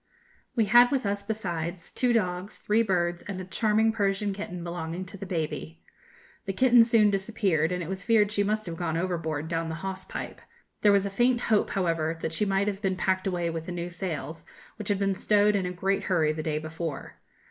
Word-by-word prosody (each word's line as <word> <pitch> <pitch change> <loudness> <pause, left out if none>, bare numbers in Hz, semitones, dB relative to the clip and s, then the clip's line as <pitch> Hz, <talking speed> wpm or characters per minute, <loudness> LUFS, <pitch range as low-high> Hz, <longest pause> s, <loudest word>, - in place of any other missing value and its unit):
We 225 -3 +3
had 240 +4 +7
with 265 -4 0
us, 200 0 -1
besides, 175 -5 -4
two 250 -1 +1
dogs, 185 -3 -1
three 215 +2 +2
birds, 175 -5 0
and 195 -2 -4
a 185 - -6
charming 220 +3 +2
Persian 200 -1 0
kitten 180 -3 -6
belonging 170 +1 -4
to 190 +3 -11
the 195 0 -7
baby. 160 -1 -4 0.6
The 195 - -2
kitten 245 +1 +6
soon 225 -3 +4
disappeared, 195 -5 0
and 180 -1 -2
it - - -6
was 190 +1 -4
feared 215 -2 +3
she 205 -1 +2
must 215 +1 -1
have 170 -2 -5
gone 165 -2 -1
overboard 165 -4 -2
down 165 0 -2
the 160 - -3
hawse 190 -1 -4
pipe. - - -7 0.4
There 205 - +6
was 200 -1 +3
a 200 - -3
faint 240 +4 +2
hope, 215 -3 +2
however, 165 -4 0
that 160 - -3
she 185 +6 +1
might 195 0 +1
have 200 -1 -2
been 190 -3 0
packed 185 +1 0
away 175 -3 -1
with 165 0 -5
the - - -4
new 175 0 -4
sails, 165 -3 -4 0.3
which 215 -2 -5
had 205 - +2
been 195 0 +1
stowed 210 +2 +3
in 190 -2 0
a - - -3
great 195 +2 -1
hurry 160 -5 +2
the 155 - -4
day 155 -1 -1
before. 160 -1 -5
190 Hz, 215 wpm, -27 LUFS, 170-210 Hz, 0.6 s, had